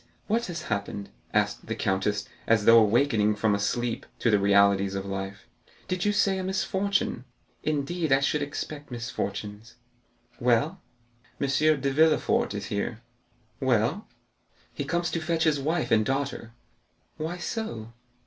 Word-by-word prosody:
What 230 +3 0
has 175 -2 -5
happened?" 100 -1 -4 0.2
asked - - 0
the - - -2
countess, 100 +2 0 0.2
as 110 -2 +3
though 115 0 +9
awakening 110 -1 +3
from 105 0 +1
a 100 - 0
sleep 120 +3 -1
to 115 - +2
the 105 - +4
realities 100 -1 +4
of 95 0 -3
life; 95 0 -5 0.4
"did 185 +1 -1
you 205 - +3
say 195 -2 +2
a - - -3
misfortune? 190 - 0 0.4
Indeed, 155 +2 -1
I 135 - +6
should 145 +2 +1
expect 145 +1 -5
misfortunes." 110 -3 -5 0.7
"M. 125 +10 +2 0.6
de 140 0 +2
Villefort 155 -7 +3
is 100 -1 -4
here." 110 +3 -3 0.6
"Well?" 130 - +1 0.7
"He - - -4
comes 175 0 -1
to 165 - -2
fetch 160 0 0
his 155 -3 +2
wife 160 +4 -1
and 110 -1 +5
daughter." 135 -2 -2 0.6
"Why 160 +3 -3
so?" 120 - -5
125 Hz, 140 wpm, -27 LUFS, 105-160 Hz, 0.7 s, though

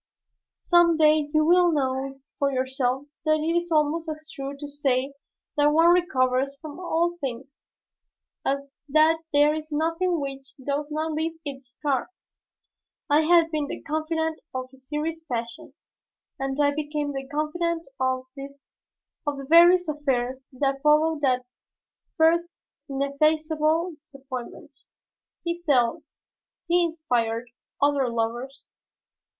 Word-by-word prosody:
Some 345 -2 +4
day 305 -1 +4
you 310 0 +3
will 350 +1 +5
know 270 -2 -2 0.2
for 280 -1 +2
yourself 260 0 -1 0.2
that 310 0 +3
it 325 +2 0
is 345 0 -1
almost 315 +1 +1
as 310 0 -6
true 275 -1 -6
to 290 +1 -7
say 275 -2 0 0.4
that 290 0 +5
one 330 +3 +5
recovers 275 -6 +1
from 310 0 -9
all 345 -1 0
things 270 +1 -6 0.8
as 280 0 -2 0.2
that 310 +3 +4
there 290 +1 +4
is 310 0 -6
nothing 330 +3 0
which 270 -1 -6
does 285 +2 -3
not 310 +1 -2
leave 320 +1 -2
its 270 -3 -8
scar. 275 -2 -1 1.0
I 295 +2 +6
had 330 0 +4
been 305 -2 -1
the - - -6
confidant 320 +1 -2 0.2
of 255 0 -4
his 265 -1 -18
serious 320 +2 -3
passion, 235 +3 -5 0.6
and 270 +1 -3
I 285 0 +3
became 295 -1 -3
the 270 0 -5
confidant 330 +3 -2
of 260 0 0
the 280 0 -9
various 350 +2 +7
affairs 265 -3 -2
that 275 +1 -1
followed 300 +1 +3
that 255 -3 +1 0.7
first 340 +2 +3 0.4
ineffaceable 310 +4 +1
disappointment. 265 -4 -9 0.6
He 340 0 -3
felt, 280 -2 +2 0.6
he 350 +1 +3
inspired, 245 -8 -1 0.3
other 280 -3 +2
loves. 235 +4 -3
295 Hz, 125 wpm, -25 LUFS, 270-320 Hz, 1.0 s, various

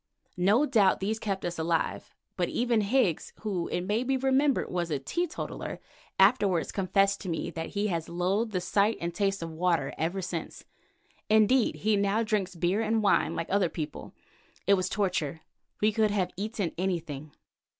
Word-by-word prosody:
No 205 +10 +4
doubt 215 -9 +3
these 215 +3 -1
kept 195 -3 -3
us 175 -1 -3
alive, 165 0 -1 0.2
but - - 0
even 235 -2 +1
Higgs, 205 - +1
who 190 -6 -2
it 175 - -2
may 210 +6 0
be 265 +1 +1
remembered 270 +1 +2
was 175 -1 -1
a 150 - 0
teetotaller, 340 - -4 0.4
afterwards 195 -4 +4
confessed 195 +1 +1
to 190 - -5
me 165 +1 -2
that 165 -1 -5
he 205 - +1
has 165 -3 -2
loathed 190 +6 0
the 185 -3 -1
sight 200 +4 +2
and 170 0 -3
taste 195 0 0
of 165 - -5
water 165 -3 0
ever 170 +5 -1
since. 175 -3 -5 0.6
Indeed 220 +3 +4
he 215 -1 +1
now 200 +3 +1
drinks 205 -5 -1
beer 175 +5 +1
and 220 0 +1
wine 200 - +3
like 165 - -4
other 195 -3 +2
people. 155 -3 -6 0.5
It 200 - +5
was 185 -1 +1
torture; 175 -6 -1 0.4
we 215 +1 +4
could 215 0 +2
have 190 -3 0
eaten 200 -3 -2
anything. 155 -6 -3
195 Hz, 170 wpm, -28 LUFS, 175-215 Hz, 0.6 s, It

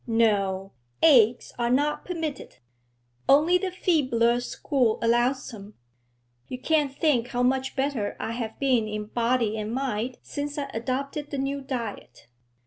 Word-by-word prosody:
No 200 -4 +1 0.3
eggs 245 -6 +5
are 235 0 +1
not 290 +4 +1
permitted; 320 -6 -5 0.7
only 315 +6 +5
the 380 - -2
feebler 260 -10 +2
school 245 -1 0
allows 240 +3 +1
them. 210 -2 -11 0.7
You 255 - -5
can't 295 0 +1
think 270 -4 +1
how 245 0 -1
much 265 +1 0
better 265 -6 -1
I - - -3
have 230 -1 -4
been 255 -5 +2
in 210 0 -4
body 230 -1 0
and 215 +1 -4
mind 250 -1 -2
since 290 0 -5
I 285 -1 -3
adopted 275 +5 -3
the 285 - -4
new 275 +1 -2
diet.' 245 - -6
255 Hz, 140 wpm, -26 LUFS, 230-280 Hz, 0.7 s, eggs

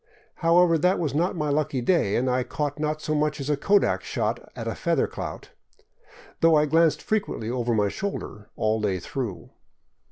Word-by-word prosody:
However, 170 -1 +4
that 180 +4 +3
was 155 -5 -2
not 170 +5 0
my 150 -3 -1
lucky 145 -2 0
day, 120 - +2
and 130 - +1
I 125 0 +1
caught 145 +3 -3
not 155 0 -2
so 155 - -1
much 150 0 0
as 140 +2 -2
a - - +3
kodak 200 +8 +2
shot - - -2 0.2
at - - -5
a - - -1
feather - - +1
clout, - - -7 0.9
though 165 -1 +5
I 150 0 +4
glanced 160 +1 +2
frequently 205 - -2
over 120 -2 0
my 105 -1 +2
shoulder 110 - -5
all 110 0 0
the 105 - +1
day 95 -2 -1
through. 115 -1 -5
150 Hz, 190 wpm, -25 LUFS, 120-165 Hz, 0.9 s, though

